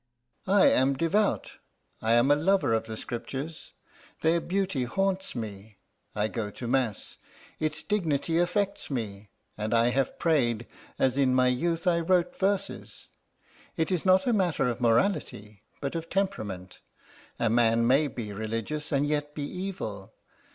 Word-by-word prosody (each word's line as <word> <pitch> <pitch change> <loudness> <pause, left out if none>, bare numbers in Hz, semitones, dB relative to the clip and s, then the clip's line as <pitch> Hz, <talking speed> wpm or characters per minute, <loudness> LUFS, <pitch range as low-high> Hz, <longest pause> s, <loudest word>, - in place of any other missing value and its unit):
"I 195 +1 +5
am 135 +2 +4
devout; 180 +8 0 0.4
I 110 +1 +2
am 120 +4 +4
a - - +7
lover 175 -4 +2
of 110 0 0
the 110 -1 -6
Scriptures 135 +8 -5 0.5
their 165 +1 +3
beauty 185 -8 -1
haunts 190 +7 -1
me; 105 -2 -7 0.4
I 105 0 +1
go 110 -2 -3
to 120 +4 -7
mass 125 -5 -1 0.4
its 155 0 -1
dignity 165 -5 0
affects 195 +3 0
me; 105 -6 -4 0.3
and 110 +2 0
I 115 +1 +4
have 135 +2 0
prayed, 120 -8 +1 0.3
as 130 +1 +2
in 130 -2 +3
my 130 0 +4
youth 165 +7 -1
I 175 -2 +3
wrote 180 +1 +1
verses. 195 +1 -2 0.7
It 160 +2 0
is 180 -3 0
not 190 0 +4
a 245 - +2
matter 175 - +1
of 120 0 -3
morality, 115 - 0 0.2
but 140 - -3
of 165 0 -4
temperament. 105 - -3 0.6
A 115 -2 +1
man 115 0 +3
may 135 +5 +4
be 110 -6 -6
religious 115 +8 -3
and 140 0 +2
yet 145 0 -2
be 145 - -3
evil. 145 - -5
140 Hz, 150 wpm, -28 LUFS, 115-175 Hz, 0.7 s, a